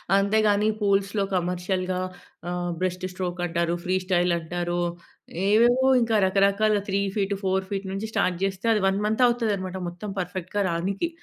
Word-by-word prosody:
అంతేగాని, 205 +1 +3
పూల్స్‌లో 200 0 +1
కమర్షియల్‌గా 180 +1 -1 0.5
ఆహ్, 175 0 -2
బ్రెస్ట్ 185 0 -2
స్ట్రోక్ 180 -1 -4
అంటారు, 170 0 0
ఫ్రీ 185 +1 0
స్టైల్ 180 -1 +2
అంటారు, 175 +1 -3 0.7
ఏవేవో 240 +5 +4
ఇంకా 230 -1 +1
రకరకాలుగా 200 +2 +3
3 195 +1 +1 0.2
ఫీట్, 200 0 0
4 190 0 0
ఫీట్ 195 -1 -3
నుంచి 200 +3 -4
స్టార్ట్ 180 -1 +1
చేస్తే, 195 +1 -2
అది 210 - +1
1 195 +1 +1
మంత్ 220 +4 +2
అవుతుందనమాట, 205 -6 -1
మొత్తం 180 +4 -8
పర్ఫెక్ట్‌గా 185 +2 -3
రానికి. 195 - -1
195 Hz, 145 wpm, -25 LUFS, 180-205 Hz, 0.7 s, ఏవేవో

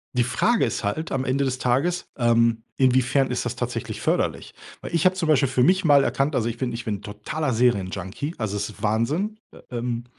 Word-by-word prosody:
Die 125 - +3
Frage 165 - +1
ist - - -3
halt, 155 +11 -2
am 130 -1 -1
Ende 135 +2 +1
des 130 -1 -1
Tages, 140 +9 0
ähm, 115 -1 +2
inwiefern 130 +1 +3
ist - - -1
das - - -3
tatsächlich - - -4
förderlich? - - -1 0.3
Weil 170 - -5
ich 165 - +2
habe 185 - +5
zum 175 -4 -2
Beispiel 140 -3 +3
für 130 - +1
mich 185 +7 +3
mal 145 -4 +5
erkannt, 140 +2 0
also, 115 - 0
ich 120 0 -3
bin 125 -1 -2
ich 115 -1 -6
bin 105 -2 -1
‘n 100 - -9
totaler 105 +8 -3
Serienjunkie. 105 - -1
Also, 110 -3 -3
es 100 +1 -2
ist 110 - -13
Wahnsinn. 150 - 0
Äh, - - -15
ähm, 120 0 -3
125 Hz, 220 wpm, -24 LUFS, 115-145 Hz, 0.3 s, habe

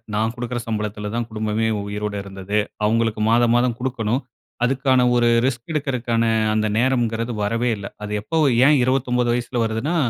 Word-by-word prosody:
நான் 110 +2 0
கொடுக்கிற 120 0 -4
சம்பளத்தில 105 -1 -3
தான் 120 -1 -2
குடும்பமே 110 0 -1 0.2
உயிரோடு 105 0 -3
இருந்தது. 100 +1 -4 0.3
அவங்களுக்கு 115 0 +1
மாதம் 120 0 +4
மாதம் 120 -1 +2
குடுக்கணும். 125 -1 -1 0.4
அதுக்கான 130 0 +2
ஒரு 120 -1 +3 0.2
ரிஸ்க் 125 +1 -2
எடுக்கிறதுக்கான 125 -6 0 0.3
அந்த 110 0 +1
நேரம்ங்கிறது 120 -2 +1
வரவே 115 +4 0
இல்ல. 100 - -8 0.2
அது 105 - -5
எப்போ 160 +10 -3 0.3
ஏன் 150 +1 +6
29 125 -1 +1
வயசுல 120 +1 -3
வருதுன்னா, 115 +9 -1
115 Hz, 150 wpm, -21 LUFS, 110-125 Hz, 0.4 s, ஏன்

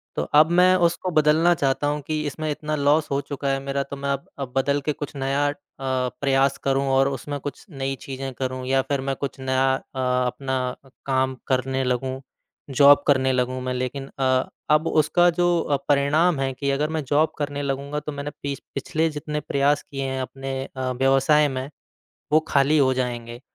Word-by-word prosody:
तो - - 0
अब 155 +2 +7
मैं 185 +1 +6
उसको 175 +2 0
बदलना 155 +3 +4
चाहता 140 0 0
हूँ 150 0 -1
कि 155 -1 -1
इसमें 155 +2 -4
इतना 155 +1 -2
लॉस 150 +2 +2
हो 140 - +1
चुका 140 0 -4
है 135 0 +1
मेरा 140 0 -1
तो 140 - -8
मैं 140 0 -4
अब 140 0 -3
अब 130 -2 -4
बदलकर 140 +2 +1
कुछ 145 0 -5
नया 140 +1 0
अ, - - -2 0.3
प्रयास 135 +1 +1
करूँ 135 0 +1
और 135 +1 +4
उसमें 140 +2 -5
कुछ 145 - -7
नई 135 -2 -3
चीज़ें 135 -1 -6
करूँ 130 0 -4
या 135 0 +3
फिर 140 -2 0
मैं 135 - 0
कुछ 140 0 -5
नया 130 0 +1
अ, - - -6 0.2
अपना 125 0 -1 0.3
काम 130 -1 +1
करने 130 0 0
लगूँ, 130 +1 -2 0.5
जॉब 140 +1 +6
करने 130 -2 +3
लगूँ 130 0 -1
मैं। 130 0 -2
लेकिन 130 +2 -3
अ, 130 -1 +2 0.2
अब 155 +2 +4
उसका 175 +3 +3
जो 170 -5 +2
परिणाम 145 +3 +3
है 135 -1 -1
कि 140 +2 -3
अगर 150 +3 0
मैं 155 - -1
जॉब 150 +4 +2
करने 145 -1 -3
लगूँगा 140 +1 -3
तो 150 - -6
मैंने 145 +1 -5
पिछ 140 -1 -3 0.2
पिछले 160 +4 0
जितने 150 0 -4
प्रयास 140 0 +1
किए 135 -1 -5
हैं 130 0 -2
अपने 135 0 -5
अ, 130 -1 -2
व्यवसाय 135 +3 +3
में, 130 +1 -4 0.6
वो 155 - +6
खाली 140 +2 +3
हो 130 -2 +4
जाएँगे। 120 -1 -4
140 Hz, 190 wpm, -23 LUFS, 130-145 Hz, 0.6 s, अब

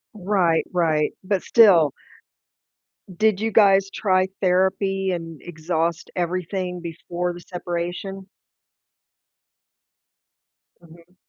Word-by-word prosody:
Right, 185 -5 +1
right, 160 -4 +1
but 190 -1 -1
still 180 - +5 1.2
Did 215 +1 +1
you 225 0 -1
guys 195 -2 +4
try 185 -2 +1
therapy 190 +1 +1
and 165 -3 -6
exhaust 165 0 -3
everything 180 +1 -3
before 175 +1 -4
the 175 - -11
separation? 180 +2 -5 2.5
Mhm. 170 +2 -19
180 Hz, 85 wpm, -22 LUFS, 170-195 Hz, 2.5 s, still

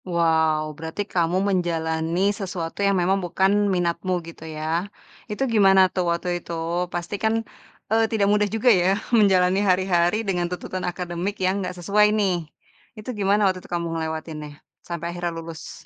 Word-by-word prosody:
Wow, 160 -3 +1
berarti 160 +5 -5
kamu 175 0 +1
menjalani 165 -2 -1
sesuatu 185 -4 -5
yang 200 -1 +3
memang 190 +2 +1
bukan 200 +3 +2
minatmu 175 +1 -1
gitu, 165 -1 -11
ya? 165 +5 -2 0.4
Itu 210 +5 -2
gimana 195 -3 +6
tuh 185 - 0
waktu 170 +1 -1
itu? - - -21 0.4
Pastikan, 200 +5 -1 0.6
eee, 225 0 +4
tidak 215 -3 +2
mudah 210 0 +2
juga 225 +3 +3
yah 190 +1 +3 0.2
menjalani 190 -4 +4
hari-hari 180 0 +2
dengan 180 -2 0
tuntutan 180 +1 -5
akademik 180 +3 -4
yang 185 - +2
enggak 185 -1 -5
sesuai 200 +4 +3
nih. 200 -3 +2 0.6
Itu 215 +3 -8
gimana 200 +1 +3
waktu 185 -1 +1
itu - - -16
kamu 170 -1 -1
ngelewatinnya 160 -1 -4 0.4
sampai 170 -1 -5
akhirnya 175 0 -3
lulus? 165 -1 -9
180 Hz, 150 wpm, -23 LUFS, 170-195 Hz, 0.6 s, gimana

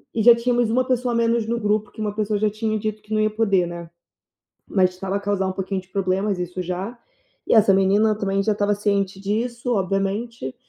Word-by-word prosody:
e 225 - +1
já 240 +1 +9
tínhamos 240 -1 +1
uma 255 +2 +2
pessoa 250 -1 0
a - - +1
menos 230 -1 +1
no 235 +1 -1
grupo, 210 -1 0
que - - -15
uma 210 -1 -2
pessoa 210 -1 -1
já 215 0 +2
tinha 215 +1 -2
dito 215 0 -4
que 215 +1 -7
não 215 - +2
ia 215 - +2
poder, 200 -5 +1
né. 170 -1 -8 0.8
Mas 185 -2 +3
estava 190 +2 -4
a - - -2
causar 200 -1 -1
um - - -2
pouquinho 190 0 -3
de 180 - -25
problemas, 195 +1 -1
isso 180 +1 -4
já, 185 +7 -5 0.5
e - - 0
essa 210 -3 +6
menina 200 +3 +3
também 195 -1 0
já 215 - +1
estava 205 0 +1
ciente 200 -2 -1
disso, 235 +4 -2
obviamente, 195 - -2
205 Hz, 220 wpm, -22 LUFS, 195-220 Hz, 0.8 s, já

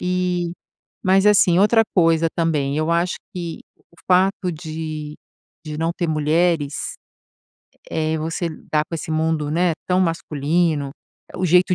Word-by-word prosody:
E, 180 -1 -1 0.5
mas 190 +1 +4
assim, 190 -4 +5
outra 215 +3 +5
coisa 165 -2 +4
também, 150 -4 0
eu 155 +1 0
acho 170 +1 +1 0.2
que 170 -2 -5 0.2
o - - -30
fato 185 0 +2
de 155 -2 -6 0.5
de 155 -1 -5
não 165 +1 0
ter 175 - -1
mulheres, 155 -1 0 1.0
eh 160 0 -1
eh, - - -1
você 165 +2 -2 0.2
dar 150 0 +2
com 165 - -5
esse 160 - -6
mundo, 155 -1 0
né, 170 +2 +2
tão 180 0 +2
masculino 160 -3 0 0.5
o 185 - -1
jeito 180 +2 +4
165 Hz, 145 wpm, -21 LUFS, 155-180 Hz, 1.0 s, assim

